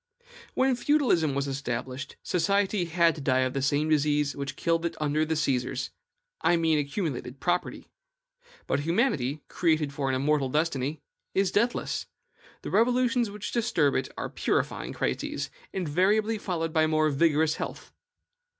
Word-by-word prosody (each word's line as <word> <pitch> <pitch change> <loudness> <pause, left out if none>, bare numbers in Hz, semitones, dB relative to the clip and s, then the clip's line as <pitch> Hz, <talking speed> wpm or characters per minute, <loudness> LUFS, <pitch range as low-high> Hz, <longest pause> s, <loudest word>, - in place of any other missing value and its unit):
When 260 0 +3
feudalism 240 - +2
was 140 0 -1
established, 130 0 -4
society 195 +2 +1
had 170 0 +3
to 150 - -8
die 130 -2 +2
of 130 0 0
the 135 - -1
same 145 +3 +1
disease 150 -1 +2
which 140 0 -4
killed 165 0 0
it 170 - -3
under 150 0 +1
the 160 +1 -1
Caesars, 130 -5 -1 0.5
I 175 - +3
mean 160 -2 +2
accumulated 140 -4 -3
property. 175 +5 -1 0.8
But - - 0
humanity, 150 - 0
created 155 -4 +1
for 140 -1 -1
an 130 - +1
immortal 140 0 +1
destiny, 150 -1 -1 0.3
is 195 -1 +2
deathless; 235 +4 0 0.6
the - - -5
revolutions 245 0 +2
which 210 0 -6
disturb 220 - +2
it 130 - -1
are - - -3
purifying - - -1
crises, 65 - -2 0.2
invariably 195 +6 +1
followed 165 -5 -2
by 155 -1 +3
more 155 -1 +2
vigorous 155 +1 +2
health. - - -6
155 Hz, 145 wpm, -27 LUFS, 140-185 Hz, 0.8 s, When